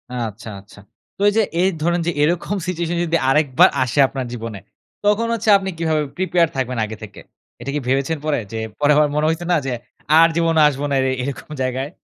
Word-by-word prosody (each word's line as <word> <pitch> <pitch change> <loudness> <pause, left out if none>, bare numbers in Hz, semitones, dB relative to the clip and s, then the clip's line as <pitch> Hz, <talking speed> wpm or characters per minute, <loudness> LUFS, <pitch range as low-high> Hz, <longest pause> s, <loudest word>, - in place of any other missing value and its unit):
আচ্ছা, 115 -2 -5
আচ্ছা। 100 +1 -17 0.4
তো - - -9
এইযে 220 +2 +2 0.2
এই 190 - +3
ধরেন 175 +2 +1
যে 175 - +2
এরকম 175 +6 0
সিচুয়েশন 175 -1 -2
যদি 170 0 +1
আরেকবার 135 -2 +4
আসে, 130 +3 -2
আপনার 130 -1 -5
জীবনে। 115 -4 -6 0.5
তখন 210 +3 +2
হচ্ছে 225 -1 -1
আপনি 195 -1 -4
কিভাবে 160 -2 0 0.2
প্রিপেয়ার 180 -2 +2
থাকবেন 130 -2 -2
আগে 110 0 -8
থেকে? 105 -2 -10 0.4
এটা 130 - -6
কি - - 0
ভেবেছেন 135 +5 0
পরে 155 -1 +1
যে 115 - -4 0.2
পরে 145 0 +3
আবার 150 - +4
মনে 150 +1 +1
হইছে 165 +2 -2
না, - - +4
যে 135 - -2 0.5
আর 165 - +7
জীবনে 165 -2 +2
আসবো 145 0 -2
না, 140 - 0
এর - - 0 0.2
এরকম 140 +2 -6
জায়গায়? 130 +2 -2
150 Hz, 200 wpm, -20 LUFS, 130-170 Hz, 0.5 s, আর